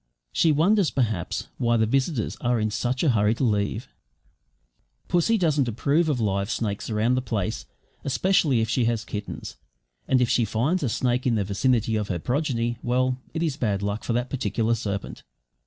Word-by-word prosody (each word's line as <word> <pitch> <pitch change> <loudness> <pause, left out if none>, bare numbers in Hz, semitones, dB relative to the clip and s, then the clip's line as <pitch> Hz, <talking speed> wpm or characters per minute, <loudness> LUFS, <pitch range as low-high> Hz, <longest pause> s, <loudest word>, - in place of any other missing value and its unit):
She 165 - +4
wonders, 175 +4 +3
perhaps, 110 -9 -1
why 120 -1 +2
the 110 - +3
visitors 130 0 0
are 120 -1 +1
in 110 0 0
such 125 +6 -1
a 160 - +4
hurry 110 0 +2
to 135 - -2
leave. 105 0 0 1.2
Pussy 180 +6 +2
doesn't 150 - +2
approve 145 +8 +1
of 140 -5 0
live 100 -2 0
snakes 105 -3 -2
round 110 +3 +2
the 130 - 0
place, 110 -3 -3 0.4
especially 140 -3 +2
if 110 - 0
she 120 +2 +1
has 115 -2 0
kittens; 105 -1 -6 0.5
and 130 - +3
if 125 - +3
she 120 - +2
finds 120 - 0
a 135 - 0
snake 125 +2 0
in 120 - +2
the 105 - +1
vicinity 110 +2 +1
of 105 -1 -2
her 90 - -2
progeny 120 - -1
well, 130 +1 0 0.2
it 165 - 0
is 150 -4 -1
bad 105 -7 0 0.2
for 120 - -1
that 120 +2 -1
particular 115 -4 0
serpent. 100 -3 -4
120 Hz, 180 wpm, -25 LUFS, 110-135 Hz, 1.2 s, She